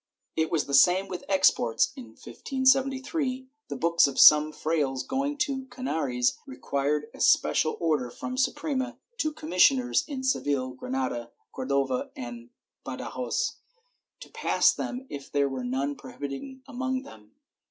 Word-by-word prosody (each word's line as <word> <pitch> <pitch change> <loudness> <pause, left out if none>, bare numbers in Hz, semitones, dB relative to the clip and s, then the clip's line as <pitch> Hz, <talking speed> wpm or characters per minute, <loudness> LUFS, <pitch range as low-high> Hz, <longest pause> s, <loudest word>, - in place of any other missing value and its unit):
^ - - -66 0.3
It 160 0 +1
was 160 -3 +1
the 140 - -6
same 180 +7 +5
with 180 -2 -6
exports. 120 - +3
In - - -9
1573 260 - 0 0.2
the - - -5
books 170 -2 +3
of 135 -2 -4
some 150 0 +8
frailes 145 -5 -1
going 280 +2 -1
to 280 -2 0
the - - -13
Canaries 155 - -1
require 150 - -2
a - - -13
special 155 - +3
order 150 -7 0
from 245 - -7
the 255 - -4
Suprema 260 -2 -1 0.2
to 310 - 0
commissioners 265 - +3
in 275 -4 -5
Seville, 145 - 0
Granada, 125 -2 -3 0.2
Cordova 135 -1 -1
and 120 -1 -8 0.3
Badajoz 475 -1 -3 0.6
to - - -10
pass - - +3
them 255 +1 -5
if 140 -1 -8
there 140 -1 +2
were 135 -2 -4
none 135 +3 -1
prohibited 145 - -8
among 260 +1 -3
them. 105 - -15
160 Hz, 145 wpm, -27 LUFS, -, 0.6 s, some